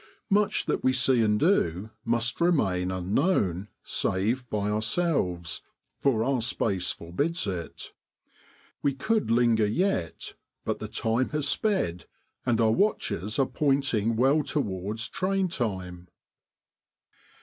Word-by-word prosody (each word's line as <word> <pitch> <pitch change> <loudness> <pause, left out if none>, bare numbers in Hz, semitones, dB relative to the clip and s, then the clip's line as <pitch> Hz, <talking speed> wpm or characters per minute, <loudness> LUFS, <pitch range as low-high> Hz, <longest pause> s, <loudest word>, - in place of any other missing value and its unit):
Much 205 +1 +2
that - - -1
we 130 - +4
see 130 -1 +3
and 105 -1 +2
do 110 - +1
must 120 +3 0
remain 95 - +2
unknown, 95 - 0 0.2
save 115 +7 0
by 105 -1 -1
ourselves, 105 - 0 0.4
for 120 -6 +2
our 135 -1 +1
space 100 -6 0
forbids 145 - -2
it. 90 -5 -5 0.9
We 140 -2 +1
could 215 - 0
linger 115 -2 +3
yet, 110 - -1 0.3
but - - -2
the - - -5
time 115 +3 0
has 150 -1 -1
sped, 145 - 0 0.4
and 120 -2 +2
our 110 -1 +4
watches 110 - 0
are 135 - +3
pointing 135 -7 +1
well 135 +6 +3
towards 110 - -2
train 190 0 0
time. 95 - -4
115 Hz, 120 wpm, -27 LUFS, 95-140 Hz, 0.9 s, we